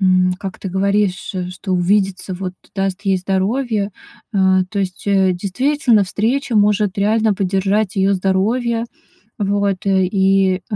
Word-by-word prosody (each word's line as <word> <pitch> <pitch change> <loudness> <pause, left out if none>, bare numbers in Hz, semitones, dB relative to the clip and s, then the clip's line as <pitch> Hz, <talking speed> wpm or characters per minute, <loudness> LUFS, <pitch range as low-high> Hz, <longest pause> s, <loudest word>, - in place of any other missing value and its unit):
м, 185 -1 +3
как 195 -2 -6
ты 195 - -5
говоришь, 195 0 0 0.2
что 185 +1 -5
увидеться 190 +1 0
вот 185 0 -5 0.2
даст 195 0 -2
ей 195 -2 +2
здоровье, 200 +3 -1 0.4
а. 190 -1 +3
То 200 +2 -4
есть, 185 +1 -5
э, 190 -2 +3
действительно, 235 - +1
встреча 230 +5 -1
может 205 -1 +2
реально 215 +1 +2
поддержать 195 +2 0
ее 195 +1 +3
здоровье, 225 +5 0 0.6
вот, 200 -1 0
и, 190 -1 +2
э, - - 0
195 Hz, 135 wpm, -18 LUFS, 190-210 Hz, 0.6 s, м